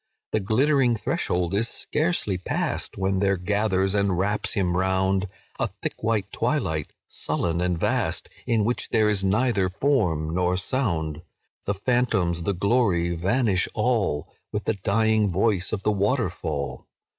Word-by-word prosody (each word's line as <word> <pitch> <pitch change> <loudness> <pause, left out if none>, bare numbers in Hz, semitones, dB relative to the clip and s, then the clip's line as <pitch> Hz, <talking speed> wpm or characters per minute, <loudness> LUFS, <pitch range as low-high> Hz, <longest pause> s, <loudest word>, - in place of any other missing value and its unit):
"The 110 - +2
glittering 125 +4 +2
threshold 90 -3 -1
is 110 +3 +2
scarcely 155 - 0
passed, 90 - -2
When 95 0 0
there 100 -1 +2
gathers 95 0 +1
and 100 -3 +1
wraps 105 +3 0
him 90 -4 0
round 95 +1 +1 0.3
A - - 0
thick - - -4
white 110 -3 0
twilight, 80 -2 -1
sullen 85 0 -1
and 90 -1 0
vast, - - 0 0.2
In 110 -3 +2
which 120 +2 -1
there 110 -2 +3
is 105 -2 +2
neither 100 -1 +2
form 90 - 0
nor 90 0 +1
sound; 85 - -1 0.5
The 100 - +1
phantoms, 100 -6 +1
the 100 +4 0
glory, 95 -4 +2
vanish 95 +2 +1
all, 75 0 0 0.2
With 105 - -2
the - - +1
dying 110 +1 +2
voice 95 0 +1
of 100 -3 -3
the 105 - +2
waterfall. 100 - -1
100 Hz, 145 wpm, -25 LUFS, 90-110 Hz, 0.5 s, there